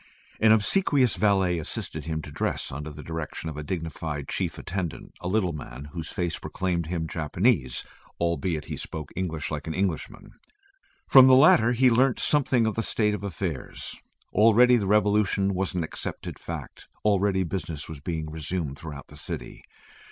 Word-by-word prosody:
An 110 0 +5
obsequious 130 - +3
valet 95 -3 +2
assisted 80 - -4
him 80 -1 -3
to 75 - -9
dress 70 - -2
under 75 +3 -5
the 75 0 -9
direction 80 0 -5
of - - -9
a - - -3
dignified 80 -2 -4
chief - - -2
attendant, 90 -3 -5
a 90 - -4
little 95 -3 +1
man 70 -1 -8
whose 80 -3 -5
face 85 -2 -2
proclaimed 85 -3 -2
him 80 -1 -2
Japanese, 80 - +1 0.4
albeit 85 -2 -1
he - - -5
spoke 80 -2 -6
English 80 -5 -3
like 75 +1 -4
an 80 - -3
Englishman. 95 -5 -3 0.8
From 130 -1 +9
the 130 - +8
latter 125 -4 +6
he 125 +1 +4
learnt 125 +2 +3
something 130 -5 +2
of 110 - +1
the 115 - -1
state 105 -2 +1
of 100 -1 -4
affairs. 90 -6 -4 0.4
Already 115 +4 +6
the 105 -5 0
revolution 105 -1 +3
was 95 0 -2
an 90 - 0
accepted 80 - -6
fact; - - -8 0.2
already 100 -2 +3
business 85 -4 -4
was 80 -3 -8
being 80 +1 -3
resumed 80 -2 -3
throughout 75 -4 -8
the - - -13
city. - - -7
90 Hz, 165 wpm, -26 LUFS, 80-105 Hz, 0.8 s, From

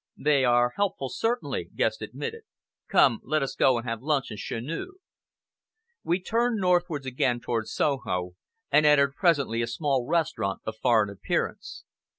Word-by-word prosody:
"They 145 -2 +2
are 120 0 +3
helpful, 190 -10 -1
certainly," 235 - -2
Guest - - 0
admitted. 460 0 -6 0.5
"Come, 120 -5 +4
let 155 +2 0
us 135 - -3
go 130 -2 +3
and 120 +1 -5
have 115 -1 -3
luncheon 135 -5 -1
chez 115 - -4
nous." 165 - -5 1.1
We 175 +2 +1
turned 230 +4 0
northwards 175 -6 +1
again 125 -1 0
towards 115 -2 -3
Soho, 90 -11 -1 0.4
and 150 +1 +5
entered 140 -2 +4
presently 140 - +1
a 115 - -1
small 130 0 -1
restaurant 155 - -1
of 110 - -4
foreign 110 -4 +2
appearance. 100 - -3
135 Hz, 150 wpm, -26 LUFS, 120-165 Hz, 1.1 s, and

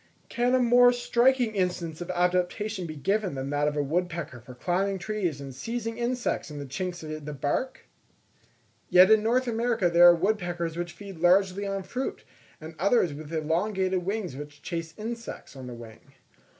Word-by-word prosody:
Can 245 +2 +2
a - - +3
more 245 0 +6
striking 245 0 +2
instance 180 -4 -2
of 175 - -6
adaptation 180 +2 0
be 155 - -7
given 195 +4 -1
than 135 +1 -4
that 145 0 +1
of 150 0 -1
a 145 - +2
woodpecker 165 -3 -2
for 125 +1 -12
climbing 190 +7 0
trees 185 -7 -2
and 135 -1 -7
seizing 230 - -4
insects 245 -4 -1
in 150 - -8
the 145 - -5
chinks 175 +5 -4
of 155 -1 -6
the 150 +1 -6
bark? 145 - -2 1.1
Yet 185 +3 +7
in 220 -1 +6
North 245 +4 +1
America 230 -5 +1
there 175 +1 +8
are 175 - +6
woodpeckers 175 -3 -1
which 175 0 -4
feed 195 -1 -10
largely 190 +3 +3
on 195 -1 -3
fruit, 250 +8 -4 0.4
and 160 +1 -9
others 195 -3 +3
with 150 +1 -9
elongated 185 +4 0
wings 195 -6 -3
which 145 +1 -10
chase 165 -1 -5
insects 230 -7 -7
on 130 -1 -8
the 125 - -7
wing. 115 -2 -12
180 Hz, 175 wpm, -27 LUFS, 155-215 Hz, 1.1 s, there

